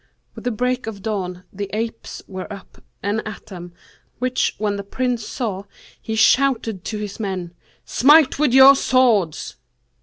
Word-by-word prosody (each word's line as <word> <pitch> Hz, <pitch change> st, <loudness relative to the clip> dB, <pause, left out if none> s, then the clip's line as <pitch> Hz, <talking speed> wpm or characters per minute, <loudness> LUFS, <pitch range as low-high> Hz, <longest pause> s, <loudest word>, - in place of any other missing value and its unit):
With -, -, -11 dB
the 245 Hz, -, +1 dB
break 250 Hz, +2 st, -1 dB
of 200 Hz, -3 st, -7 dB
day, 195 Hz, -5 st, -3 dB, 0.2 s
the 200 Hz, 0 st, -5 dB
apes 225 Hz, 0 st, -5 dB
were 190 Hz, +1 st, -7 dB
up 200 Hz, -2 st, -12 dB, 0.2 s
and 205 Hz, +2 st, 0 dB
at 215 Hz, -1 st, -8 dB
them, 175 Hz, -3 st, -10 dB, 0.5 s
which 255 Hz, +1 st, 0 dB
when 210 Hz, -1 st, -1 dB
the 200 Hz, -, -5 dB
Prince 245 Hz, +1 st, -2 dB
saw, 205 Hz, -6 st, -4 dB, 0.4 s
he 220 Hz, -, -4 dB
shouted 225 Hz, -3 st, +2 dB
to 215 Hz, -, -3 dB
his 210 Hz, +1 st, -6 dB
men, 185 Hz, -5 st, -4 dB, 0.3 s
'Smite 290 Hz, +1 st, +5 dB
with 300 Hz, -4 st, +3 dB
your 265 Hz, +2 st, +9 dB
swords.' 235 Hz, -, +1 dB
220 Hz, 155 wpm, -21 LUFS, 200-250 Hz, 0.5 s, your